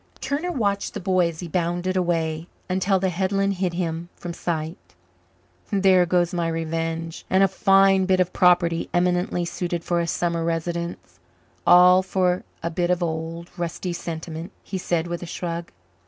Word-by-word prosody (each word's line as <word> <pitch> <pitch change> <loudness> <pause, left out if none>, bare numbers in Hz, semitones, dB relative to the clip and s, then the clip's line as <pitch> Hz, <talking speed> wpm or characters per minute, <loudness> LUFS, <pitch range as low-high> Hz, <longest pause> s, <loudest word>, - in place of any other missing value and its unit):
Turner 290 +6 -2
watched 200 - -1
the - - -2
boy 185 -2 +2
as 160 0 -8
he 175 - -5
bounded 175 +2 -1
away, 165 -2 0 0.2
until 190 +1 +1
the 190 0 0
headland 195 +2 0
hid 180 -3 0
him 170 -1 -3
from 175 -1 -6
sight. 160 - -4 0.8
"There 190 -3 +4
goes 175 +1 +2
my 170 -1 0
revenge 165 0 -3
and 190 +1 +4
a - - +6
fine 195 0 +4
bit 185 -1 +3
of 180 -1 +1
property 175 -2 +3
eminently 180 0 +1
suited 175 -1 -3
for 175 0 0
a 170 - -1
summer 170 -1 -1
residence 170 +1 -3 0.5
all 180 +1 +8
for 185 -1 0 0.2
a 170 - -1
bit 175 +1 0
of 180 0 +1
old, 165 +1 -4
rusty 175 +1 -3
sentiment," 165 +1 -6
he 190 - -4
said 170 -2 0
with 175 0 -4
a 175 - -6
shrug. 170 0 -4
175 Hz, 165 wpm, -24 LUFS, 170-185 Hz, 0.8 s, all